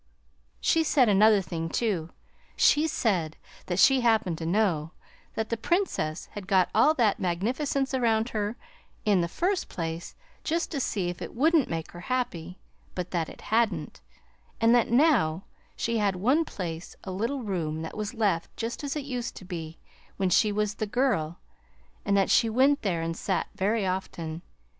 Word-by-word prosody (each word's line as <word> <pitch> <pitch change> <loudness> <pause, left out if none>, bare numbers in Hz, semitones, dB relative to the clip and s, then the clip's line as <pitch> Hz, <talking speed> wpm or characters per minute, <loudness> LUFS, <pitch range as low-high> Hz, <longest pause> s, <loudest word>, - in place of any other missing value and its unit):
She 325 - +3
said 265 -6 +3
another 210 +1 +5
thing, 165 -1 -4
too. 180 -6 -1 0.5
She 300 +2 +4
said 180 - 0 0.3
that 175 - -1
she 265 +6 +6
happened 220 -8 +2
to 160 - -4
know 175 -5 +1 0.4
that 220 0 -2
the 230 - -1
Princess 225 - -1
had 200 -3 -8
got 190 -2 +3
all 295 +9 +5
that 225 -7 +2
magnificence 260 - -1
around 230 -2 +2
her 210 0 -2 0.5
in 200 -4 +4
the 170 - 0
first 360 - -1
place 165 0 -5 0.3
just 335 +2 -1
to 295 - -2
see 195 -8 -1
if 175 - -7
it - - -7
wouldn't 310 +2 +3
make 165 -1 -4
her 175 - -10
happy, 180 -6 -3 0.4
but 180 -1 -4
that 170 -3 -1
it - - -12
hadn't, 225 0 0 0.6
and 230 +1 +5
that 240 -2 +3
now 230 - +3 0.3
she 230 -1 -1
had 200 -2 +1
one 260 - +2
place 170 - -6
a 190 - -5
little 235 +8 -2
room 160 -6 -2
that 160 - -7
was 215 +3 -4
left 200 -7 0
just 235 +4 -4
as 280 0 -3
it 295 -2 -3
used 245 -4 -4
to 190 - -10
be 165 -3 -6 0.4
when 190 -2 0
she 210 +4 +4
was 210 0 0
the 215 +1 -3
girl, 200 - 0 0.7
and 200 0 +2
that 195 - +2
she 230 - +4
went 270 +5 +3
there 170 -5 -1
and 165 0 -2
sat 190 +2 -2
very 205 +2 0
often. 170 -3 -4
205 Hz, 175 wpm, -27 LUFS, 175-245 Hz, 0.7 s, she